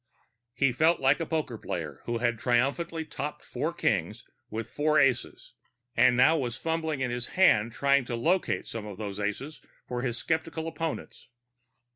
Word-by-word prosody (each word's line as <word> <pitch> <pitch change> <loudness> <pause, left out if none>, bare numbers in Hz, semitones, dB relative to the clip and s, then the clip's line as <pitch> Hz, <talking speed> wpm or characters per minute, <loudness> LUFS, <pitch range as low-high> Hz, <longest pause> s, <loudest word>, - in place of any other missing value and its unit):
He 135 -2 +3
felt 160 +7 +3
like 135 +4 +3
a 165 - -2
poker 145 -8 -2
player 75 -6 -5
who 120 0 -1
had 120 -1 0
triumphantly 140 +7 0
topped 150 -1 -5
four - - -2
kings - - -1 0.2
with 110 +1 -4
four 155 +4 +1
aces, 130 -3 0 0.4
and 125 - +5
now 130 +6 +6
was 120 -3 -3
fumbling 160 -2 -2
in 125 -2 0
his 120 0 -3
hand 115 - +5
trying 140 +2 +2
to 120 - -3
locate 170 +10 +1
some 110 -2 -6
of 100 -3 -8
those 100 -2 -5
aces 105 +9 -4 0.3
for 125 -1 -3
his 120 -2 -2
skeptical 160 +2 -2
opponents. 165 0 -5
130 Hz, 165 wpm, -28 LUFS, 120-160 Hz, 0.4 s, now